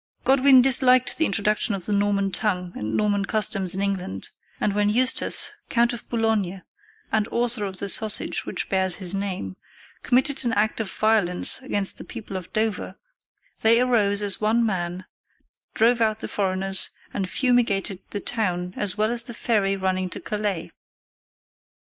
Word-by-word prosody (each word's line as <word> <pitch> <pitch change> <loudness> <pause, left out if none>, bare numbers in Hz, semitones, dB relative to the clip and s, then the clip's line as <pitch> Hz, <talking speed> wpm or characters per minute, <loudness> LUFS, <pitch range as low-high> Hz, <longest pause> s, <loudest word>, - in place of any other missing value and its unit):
] - - -44
Godwin 265 -1 +5
disliked 255 -1 +5
the 320 - +3
introduction 205 +1 0
of 185 -3 -8
the - - -4
Norman 200 -1 0
tongue 180 -4 0
and 105 +1 -3
Norman 205 -1 +1
customs 195 -3 +1
in 195 - -2
England, 185 - -4 0.3
and 205 - 0
when 205 0 +1
Eustace, 250 +4 +2 0.2
Count 235 0 +2
of 235 - -9
Boulogne 215 -5 -1 0.5
and 215 -1 +1
author 235 -3 +1
of 190 -1 -6
the 200 - -4
sausage 215 +2 +1
which - - -3
bears 190 -1 +1
his 185 -2 -5
name, 185 - -4 0.4
committed 265 +3 +1
an 235 -2 -1
act 215 +2 0
of 220 -3 -2
violence 215 -5 +2
against 205 -7 -1
the - - -8
people 220 -5 -9
of 185 -1 -7
Dover, 215 -1 -2 0.6
they 230 +1 +5
arose 210 -5 +3
as 200 0 +1
one 225 +2 +2
man, 180 -3 -3 0.7
drove 235 +1 +3
out 220 -1 +1
the - - -4
foreigners, 190 -1 -1 0.2
and 190 -2 -3
fumigated 230 -7 0
the 205 - -4
town 180 -5 -3
as 205 -1 +1
well 215 +2 +1
as 240 0 +2
the 235 0 -8
ferry 200 -5 0
running 185 -1 -1
to - - -5
Calais. 205 -5 -4
205 Hz, 165 wpm, -23 LUFS, 190-230 Hz, 0.7 s, Godwin